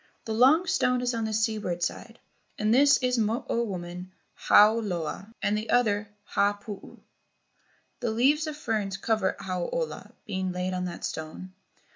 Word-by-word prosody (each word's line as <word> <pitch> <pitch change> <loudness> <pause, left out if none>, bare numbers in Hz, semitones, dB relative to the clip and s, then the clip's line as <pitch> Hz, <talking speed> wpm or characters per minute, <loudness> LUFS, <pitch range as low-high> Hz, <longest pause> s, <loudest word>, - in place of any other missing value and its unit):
The 220 - -3
long 270 +10 +5
stone 250 -7 +1
is 250 0 0
on 230 -1 -1
the 220 - -2
seaward 215 -5 -1
side, - - -4 0.4
and 215 +1 +2
this 280 +3 +6
is 250 0 +2
the - - +3
Mo 220 +3 -1
o 235 - 0
woman, 180 -3 -6 0.2
Hau 215 +2 +5
ola; 190 0 -4
and 205 - +2
the 215 +1 -4
other, 210 -4 +2
Ha 205 0 +1
puu. 205 0 -10 1.0
The 240 - -1
leaves 280 +8 +2
of 305 -1 -5
ferns 215 -8 -2
cover 215 -1 0
Hau 185 -2 -3
ola, - - -4
being 190 -2 -2
laid 180 +1 -2
on 180 0 -2
that 175 -1 -5
stone. 160 +4 -6
215 Hz, 170 wpm, -27 LUFS, 185-240 Hz, 1.0 s, this